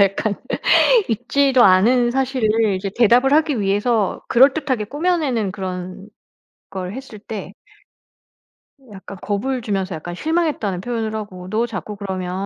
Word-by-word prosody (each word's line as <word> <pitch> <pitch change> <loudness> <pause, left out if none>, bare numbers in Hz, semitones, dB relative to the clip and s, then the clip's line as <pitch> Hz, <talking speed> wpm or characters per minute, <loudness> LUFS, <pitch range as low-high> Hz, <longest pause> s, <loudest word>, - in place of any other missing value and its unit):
이제 - - +8
약간 200 +2 +1 0.8
있지도 250 +3 +2
않은 240 +6 +4
사실을 230 -5 +1
이제 195 +1 -4
대답을 245 +4 +4
하기 300 -5 +2
위해서 205 +1 0
그럴듯하게 265 -2 +3
꾸며내는 285 - -1
그런 185 0 -6 0.6
걸 185 -1 -5
했을 260 -4 -9
때 205 -2 -8 1.4
약간 195 0 -10
겁을 245 +6 -2
주면서 195 -4 -2
약간 175 +2 -7
실망했다는 305 - -1
표현을 225 -2 -3
하고 185 -4 -7
"너 225 +4 0
자꾸 215 -1 -6
그러면 190 -1 -4
215 Hz, 300 characters per minute, -20 LUFS, 195-255 Hz, 1.4 s, 이제